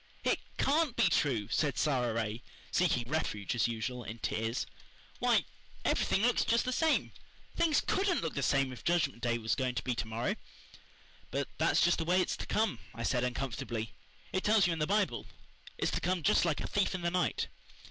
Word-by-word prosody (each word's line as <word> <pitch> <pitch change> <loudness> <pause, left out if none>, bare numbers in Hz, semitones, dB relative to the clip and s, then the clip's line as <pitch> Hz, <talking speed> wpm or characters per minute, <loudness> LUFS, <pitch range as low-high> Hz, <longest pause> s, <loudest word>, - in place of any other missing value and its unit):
"It - - +2 0.2
CAN'T 295 -2 +2
be - - +4
true," 120 -9 +1
said 145 -4 +1
Sara 125 -6 +1
Ray, 110 0 -2 0.3
seeking 155 -10 +2
refuge, 120 -9 -1
as 120 -1 +2
usual, 120 +2 -3
in 110 +2 -7
tears. 115 +1 -2 0.5
"Why, - - +3 0.4
everything 195 - +2
looks 245 0 +3
just 230 +1 +2
the 255 - 0
same. 320 +4 +2 0.4
Things 325 -3 +3
COULDN'T 385 -2 +1
look 165 - -2
the 140 - -2
same 135 -1 +2
if 120 - -11
the 175 - +3
Judgment 155 -8 0
Day 120 0 +1
was 110 -1 -1
going 130 -2 -1
to 115 - -2
be 125 - 0
to 110 - -3
morrow." 115 +2 -2 0.9
"But - - -2
that's - - +3
just 175 0 +4
the 165 - -1
way 180 +3 +3
it's 185 - 0
to - - -6
come," 215 - +1 0.2
I 115 - -4
said 120 0 +1
uncomfortably. 120 -3 -3 0.4
"It 185 - 0
tells 210 -3 +5
you 175 - +2
in 165 - -4
the 150 - +1
Bible. 205 0 0 0.5
It's - - 0
to - - -1
come 180 -2 0
just 145 - +4
like 165 -4 0
a - - -3
thief 200 -1 +1
in 180 - -5
the 170 - +1
night." 180 0 0
140 Hz, 205 wpm, -32 LUFS, 120-185 Hz, 0.9 s, tells